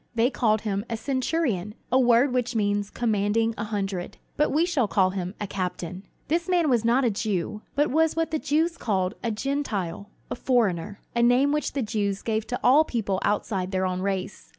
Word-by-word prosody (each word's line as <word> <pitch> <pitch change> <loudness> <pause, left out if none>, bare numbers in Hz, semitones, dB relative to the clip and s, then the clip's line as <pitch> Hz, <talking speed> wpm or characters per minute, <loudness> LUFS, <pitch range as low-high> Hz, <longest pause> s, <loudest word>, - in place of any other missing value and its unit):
They 235 +3 +3
called 220 -4 +1
him 200 -2 -2
"a 230 - -2
centurion," 255 - -1 0.2
a 260 - +5
word 245 +1 +4
which 245 -1 -1
means 205 -1 0
"commanding 225 0 +1
a 210 - -4
hundred"; 195 -4 -3 0.2
but 300 - +2
we 315 +4 +3
should 285 - 0
call 185 -2 +3
him 185 0 -4
"a 210 - -2
captain." 185 -1 -4 0.2
This 340 +3 0
man 345 -5 +3
was 235 -3 +2
not 245 +3 +3
a 235 - +3
Jew, 210 -1 -2
but 290 0 +2
was 320 +2 +2
what 325 0 0
the 315 - 0
Jews 325 +4 +1
called 190 -3 0
"a 235 - 0
Gentile," 215 -6 -3 0.2
"a - - -1
foreigner"; 210 -7 0
a 235 - +2
name 250 +4 +4
which 300 0 -1
the 275 - -1
Jews 205 -2 -2
gave 220 -1 -1
to 245 - -3
all 285 +5 +6
people 205 -9 -2
outside 200 -2 -1
their 190 -1 0
own 185 0 -2
race. 195 0 -3
220 Hz, 195 wpm, -25 LUFS, 200-260 Hz, 0.2 s, all